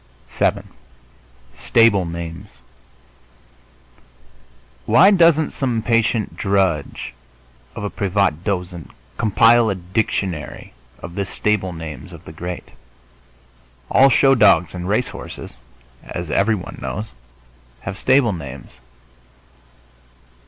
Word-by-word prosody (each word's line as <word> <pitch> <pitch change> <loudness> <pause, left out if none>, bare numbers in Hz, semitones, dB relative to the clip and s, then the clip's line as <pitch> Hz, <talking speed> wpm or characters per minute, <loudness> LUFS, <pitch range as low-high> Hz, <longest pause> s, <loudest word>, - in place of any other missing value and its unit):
VII - - 0 1.0
STABLE 115 -5 +3
NAMES 85 +3 -6 2.4
Why 195 - +6
doesn't 165 -5 +4
some 120 -5 -2
patient 115 -1 +1
drudge 95 -7 -1 0.6
of 115 - -6
a 105 - -3
privat 95 -5 0
dozent 90 -4 -4 0.3
compile 115 +2 +4
a 100 - -1
dictionary 95 -2 -3 0.2
of 85 - -9
the 100 +2 -2
stable 95 -1 -1
names 80 -2 -8
of 85 +1 -13
the - - -9
great? 90 +2 -7 1.2
All 135 +1 +6
show 135 +2 +5
dogs 100 -8 +4
and 90 0 -5
race 110 +4 +1
horses, - - -9 0.5
as 85 -3 -6
everyone 100 -1 0
knows, 105 +3 -4 0.7
have 100 - -5
stable 130 -5 +3
names. 70 -6 -8
100 Hz, 100 wpm, -20 LUFS, 85-115 Hz, 2.4 s, Why